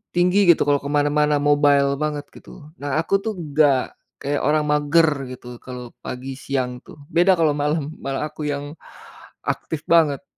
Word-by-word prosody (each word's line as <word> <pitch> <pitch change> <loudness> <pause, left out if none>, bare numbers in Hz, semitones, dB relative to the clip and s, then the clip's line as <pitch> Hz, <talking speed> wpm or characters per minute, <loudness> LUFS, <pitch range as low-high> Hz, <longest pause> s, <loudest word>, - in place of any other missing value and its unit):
tinggi 180 +3 +3
gitu 170 - +6
kalau 145 0 +2
kemana-mana 145 +1 +1
mobile 145 -1 +3
banget 150 -1 -2
gitu. 150 0 -14
Nah, 145 0 -2
aku 195 +4 +1
tuh 220 - -2 0.2
gak 145 -4 +3 0.3
kayak 145 +1 -1
orang 150 0 +2
mager 150 -1 +2
gitu 125 -1 -10
kalau 125 -2 -9
pagi 130 +2 -6
siang 125 -3 -3
tuh, - - -15 0.2
beda 180 +2 +4
kalau 160 -3 +2
malam, 150 +1 -1
malah 135 +1 -3
aku 150 -1 -5
yang 145 0 -3 0.7
aktif 160 - -3
banget. 150 -5 +3
145 Hz, 155 wpm, -22 LUFS, 140-155 Hz, 0.7 s, gitu